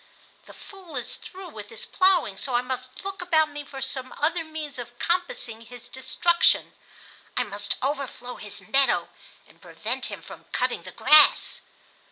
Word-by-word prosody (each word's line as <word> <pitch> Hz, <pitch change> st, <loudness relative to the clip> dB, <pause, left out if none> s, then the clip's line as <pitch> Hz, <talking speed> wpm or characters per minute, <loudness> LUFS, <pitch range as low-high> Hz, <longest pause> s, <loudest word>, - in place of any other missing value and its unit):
The -, -, -12 dB
Fool 375 Hz, -6 st, -12 dB
is 245 Hz, -, -4 dB
through 375 Hz, -1 st, -10 dB
with 210 Hz, -7 st, -9 dB
his 225 Hz, -, -9 dB
plowing, 370 Hz, -, +3 dB
so 250 Hz, +5 st, -3 dB
I 240 Hz, -, +3 dB
must 255 Hz, +5 st, -6 dB
look 390 Hz, -1 st, -4 dB
about 315 Hz, -4 st, +3 dB
me 290 Hz, 0 st, -6 dB
for 275 Hz, -1 st, -6 dB
some 260 Hz, -1 st, -3 dB
other 330 Hz, +3 st, +1 dB
means 310 Hz, -4 st, -6 dB
of 240 Hz, 0 st, -8 dB
compassing 340 Hz, -11 st, -1 dB
his 245 Hz, +1 st, -11 dB
destruction. 340 Hz, +6 st, +3 dB, 0.6 s
I -, -, +3 dB
must 205 Hz, 0 st, -2 dB
overflow 265 Hz, -3 st, -3 dB
his 205 Hz, -1 st, -7 dB
meadow 275 Hz, 0 st, +3 dB, 0.4 s
and -, -, -22 dB
prevent -, -, -3 dB
him -, -, -7 dB
from -, -, -11 dB
cutting -, -, -1 dB
the -, -, -10 dB
grass." 305 Hz, 0 st, +6 dB
275 Hz, 165 wpm, -26 LUFS, 245-335 Hz, 0.6 s, grass